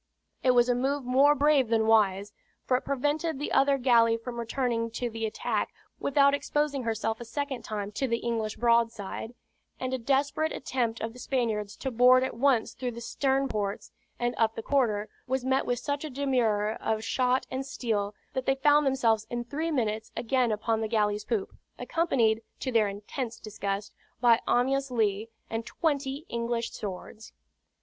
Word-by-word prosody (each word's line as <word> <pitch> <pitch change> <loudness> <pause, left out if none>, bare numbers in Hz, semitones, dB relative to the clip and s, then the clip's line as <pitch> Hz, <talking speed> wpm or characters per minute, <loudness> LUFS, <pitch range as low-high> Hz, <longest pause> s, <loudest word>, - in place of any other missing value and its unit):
It 255 -1 +3
was 240 0 +5
a 250 - +3
move 270 +3 0
more 275 +4 +5
brave 290 -2 +3
than 225 -1 +2
wise; 205 -2 +3 0.3
for 255 - +2
it 255 - -1
prevented 295 +3 -1
the 290 - -4
other 275 0 +4
galley 230 -3 +4
from 235 +1 -7
returning 235 -1 -1
to 235 +1 -3
the 225 0 -2
attack 215 - -2 0.3
without 280 0 +4
exposing 285 -1 0
herself 225 -1 -2
a - - -3
second 275 +2 -3
time 205 -1 -4
to 265 +6 -1
the 230 -1 +1
English 230 -2 -2
broadside; 230 -1 0 0.4
and 255 0 -3
a 260 - -1
desperate 280 +5 +1
attempt 235 -4 -2
of 225 0 -3
the 250 - -12
Spaniards 220 -6 -1
to 265 - -4
board 250 +2 +6
at 260 - -2
once 250 -1 +2
through 250 -2 -4
the 235 - -7
stern 270 +4 0
ports, 205 -3 -3 0.3
and 240 0 -1
up 225 -1 +2
the 225 - -5
quarter, 220 -7 +1 0.2
was 260 0 -1
met 265 0 +1
with 245 - +1
such 285 +3 -3
a 310 - -4
demurrer 235 -6 0
of 220 0 -1
shot 255 +1 +1
and 260 +1 -2
steel 220 -7 -2 0.2
that 260 -1 -3
they 270 - +3
found 290 +1 +4
themselves 230 -5 +2
in 240 0 -3
three 300 +7 -3
minutes 220 -7 -1
again 245 0 +1
upon 220 +1 0
the 220 - -1
galley's 210 -2 +1
poop, 220 -5 -2 0.2
accompanied, 235 -10 +1 0.2
to 260 - -3
their 225 -3 +3
intense 210 +4 -5
disgust, 200 -1 -4 0.3
by 235 -1 +5
Amyas 270 +2 +2
Leigh 220 -2 0 0.2
and 225 0 -3
twenty 285 +1 -2
English 235 0 -2
swords. 210 +2 -8
240 Hz, 175 wpm, -28 LUFS, 220-270 Hz, 0.4 s, board